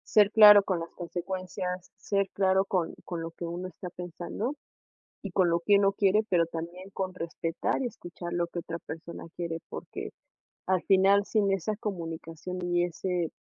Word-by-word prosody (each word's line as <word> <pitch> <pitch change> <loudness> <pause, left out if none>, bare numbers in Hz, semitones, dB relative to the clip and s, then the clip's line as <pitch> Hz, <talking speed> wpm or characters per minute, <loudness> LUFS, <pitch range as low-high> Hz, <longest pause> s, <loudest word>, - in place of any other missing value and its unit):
Ser 210 -1 +7
claro 210 -2 +10
con 185 -4 -1
las 165 - -5
consecuencias, 180 +1 -4
ser 200 -1 0
claro 190 0 +3
con, 185 -4 -1
con 170 -2 -4
lo 165 0 -4
que 170 - -7
uno 175 +2 -4
está 180 +1 -8
pensando, 180 - -4 0.7
y 200 - -5
con 180 -1 +3
lo 170 0 +2
que 200 +3 +5
uno 200 0 +4
quiere, 200 +2 +3
pero 170 -2 +4
también 170 +3 -7
con 185 -1 -3
respetar, 165 +4 -2
y 255 - 0
escuchar 175 -6 -7
lo 175 0 0
que 175 - -6
otra 170 0 -5
persona 165 +2 -8
quiere. 170 -1 -3
Porque, - - -6 0.6
al 185 -1 +2
final 195 +1 +5
sin 205 -3 +2
esa 195 +2 0
comunicación 170 -3 -5
y 175 0 +2
ese 175 -1 -2
180 Hz, 175 wpm, -29 LUFS, 170-195 Hz, 0.7 s, claro